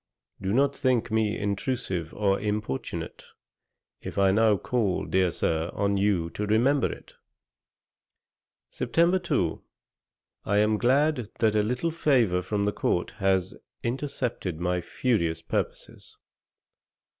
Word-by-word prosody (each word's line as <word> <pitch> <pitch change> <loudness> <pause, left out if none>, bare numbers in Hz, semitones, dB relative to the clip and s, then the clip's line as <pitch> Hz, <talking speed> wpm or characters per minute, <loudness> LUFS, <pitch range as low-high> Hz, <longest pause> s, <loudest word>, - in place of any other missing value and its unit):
Do 95 0 -1
not 140 +5 +2
think 125 -5 +1
me 110 -1 +1
intrusive 100 - -2
or 100 -2 +1
importunate, 105 -9 -4 0.8
if - - -7
I 95 -1 +4
now 110 0 +4
call, 105 -2 -1
dear 95 -1 +2
Sir, 80 0 -1
on 100 0 +1
you 95 -4 +1
to 105 +4 -3
remember 125 +7 +3
it.' - - -11 1.6
Sept. 175 +3 +2
2. 90 - 0 0.8
'I 100 +1 +1
am 105 +1 +3
glad 130 -1 +2
that 110 -3 +2
a 105 - +4
little 125 +10 -1
favour 125 - +2
from 100 +2 -1
the 105 - 0
court 90 - -1
has 95 -1 +1 0.3
intercepted 120 - -3
your 90 0 0
furious 85 -5 -1
purposes. - - -4
105 Hz, 120 wpm, -27 LUFS, 95-125 Hz, 1.6 s, I